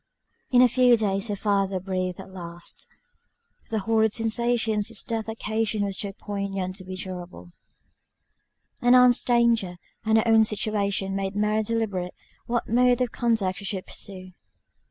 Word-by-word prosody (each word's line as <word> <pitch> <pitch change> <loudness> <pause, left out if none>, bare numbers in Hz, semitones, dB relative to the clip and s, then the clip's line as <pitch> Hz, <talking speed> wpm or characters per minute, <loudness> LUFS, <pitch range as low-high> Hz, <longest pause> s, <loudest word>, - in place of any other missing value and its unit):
In 250 -1 +6
a - - +7
few 245 0 +4
days 195 -1 0
her 205 - -2
father 195 -2 0
breathed 185 -1 -3
his 190 0 -10
last. 170 -2 -7 0.8
The 220 -3 -1
horrid 220 +1 +2
sensations 225 -2 0
his 230 -3 -1
death 225 -1 -3
occasioned 220 -1 -1
were 200 - -2
too 195 +1 -4
poignant 195 -2 -4
to 185 - -6
be 185 0 -7
durable: 180 -1 -7 1.3
and 245 0 +5
Ann's 250 -1 +6
danger, 235 -7 +2 0.3
and 220 0 +3
her 220 - +2
own 225 -1 +6
situation, 200 -2 -1
made 195 0 -3
Mary 210 +1 +1
deliberate 205 -5 -2 0.3
what 240 -1 -1
mode 245 +2 +3
of 250 -3 0
conduct 220 -6 0
she 200 - -8
should 195 -2 -2
pursue. 185 -2 -5
210 Hz, 155 wpm, -25 LUFS, 190-225 Hz, 1.3 s, a